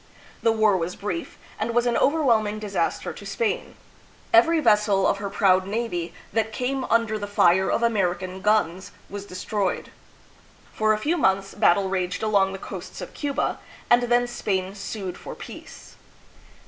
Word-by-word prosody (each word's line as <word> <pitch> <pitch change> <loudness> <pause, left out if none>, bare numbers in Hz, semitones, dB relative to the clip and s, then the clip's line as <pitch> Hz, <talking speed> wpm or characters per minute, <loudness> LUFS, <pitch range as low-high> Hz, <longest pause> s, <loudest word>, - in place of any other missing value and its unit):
The 230 - +3
war 215 -2 +3
was 170 +1 -3
brief, 180 -5 -5 0.2
and 230 +2 -2
was 240 0 +3
an 240 - +1
overwhelming 235 -8 +2
disaster 210 -2 -2
to - - -11
Spain. 470 0 -2 0.6
Every 335 -1 +6
vessel 210 -7 +3
of - - +2
her 200 0 -4
proud 190 -2 +3
navy 200 -6 -2 0.2
that 220 -1 0
came 255 +3 -2
under 225 -1 +1
the 205 - -4
fire 190 -2 +3
of 235 - 0
American 190 -4 0
guns 190 -4 +1 0.2
was 200 0 -6
destroyed. 190 +1 -2 0.8
For 215 0 +2
a - - 0
few 305 +11 0
months 195 - +1
battle 200 -2 +3
raged 185 +1 -2
along 200 -3 +3
the 195 - -5
coasts - - -8
of - - -8
Cuba, 285 -2 -2 0.3
and 240 0 +6
then 240 0 +3
Spain 195 -5 -2
sued 200 -2 -6
for - - -8
peace. - - -11
210 Hz, 160 wpm, -24 LUFS, 190-230 Hz, 0.8 s, Every